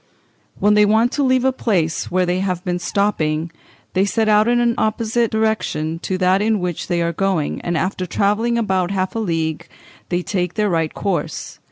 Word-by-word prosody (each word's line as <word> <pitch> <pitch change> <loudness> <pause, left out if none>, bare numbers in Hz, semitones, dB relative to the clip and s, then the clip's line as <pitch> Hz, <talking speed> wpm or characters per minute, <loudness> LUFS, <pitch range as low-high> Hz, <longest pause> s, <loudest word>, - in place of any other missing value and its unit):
"When 210 +1 +3
they 210 0 +5
want 220 +4 +3
to 285 - 0
leave 260 -1 +2
a 265 - +4
place 180 -11 -1
where 185 0 +1
they 180 +1 0
have 185 -2 -2
been 180 -1 -1
stopping, 165 -5 0 0.4
they 190 - +2
set 220 +2 0
out 215 +1 +4
in 240 0 +3
an 240 -1 +2
opposite 225 +1 0
direction 215 -8 -1
to 185 +2 -2
that 185 +1 +2
in 215 0 +1
which 180 -2 -3
they 175 -1 0
are 170 0 -1
going, 185 -4 -1
and 175 -1 -1
after 185 +1 -2
travelling 210 +6 +1
about 190 -5 0
half 190 -1 -1
a 225 - -2
league 165 -6 -2 0.4
they 180 0 -1
take 180 -3 -2
their 210 -2 +1
right 165 -2 0
course. 195 -3 -3
195 Hz, 195 wpm, -20 LUFS, 175-220 Hz, 0.4 s, they